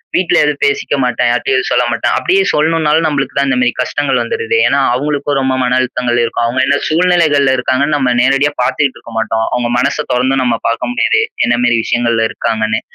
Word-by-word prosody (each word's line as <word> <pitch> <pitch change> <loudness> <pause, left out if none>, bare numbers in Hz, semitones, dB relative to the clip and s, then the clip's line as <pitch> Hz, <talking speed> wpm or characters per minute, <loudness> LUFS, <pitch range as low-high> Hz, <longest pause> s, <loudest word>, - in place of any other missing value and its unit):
வீட்ல 175 -1 +1
எதுவும் 150 -1 -2
பேசிக்க 140 0 0
மாட்டேன். 125 0 0
யார்ட்டயும் 125 +2 0
எதுவும் 130 - -2
சொல்ல 125 - +2
மாட்டேன். 120 - -1
அப்பிடியே 380 +2 +1
சொல்லணும்னாலும் 160 0 +1
நம்மளுக்கு 140 -3 -2
தான் 140 - +1
இந்தமாரி 125 -2 +1
கஷ்டங்கள் 140 +1 -1
வந்துருதே! 455 0 -2
ஏன்னா, - - +1
அவுங்களுக்கும் 145 +1 -2
ரொம்ப 130 0 0
மன 125 0 +1
அழுத்தங்கள் 125 -1 -1
இருக்கும். 115 0 -1
அவுங்க 120 +3 0
என்ன 140 +1 +1
சூழ்நிலைகள்ல 155 -5 +2
இருக்காங்கன்னு 140 +4 0
நம்ம 130 -3 +1
நேரடியா 135 +3 +2
பாத்துட்டு 135 +2 0
இருக்க 115 - -13
மாட்டோம். 110 0 -1
அவுங்க 120 -1 -1
மனச 140 +3 0
தொறந்து 130 +2 +1
நம்ம 120 -2 0
பாக்க 115 0 -2
முடியாது. 440 - +1 0.2
என்னமாரி 120 0 +1
விஷயங்கள்ல 115 -1 0
இருக்காங்கன்னு, 110 -1 -2
130 Hz, 180 wpm, -14 LUFS, 120-145 Hz, 0.2 s, சொல்ல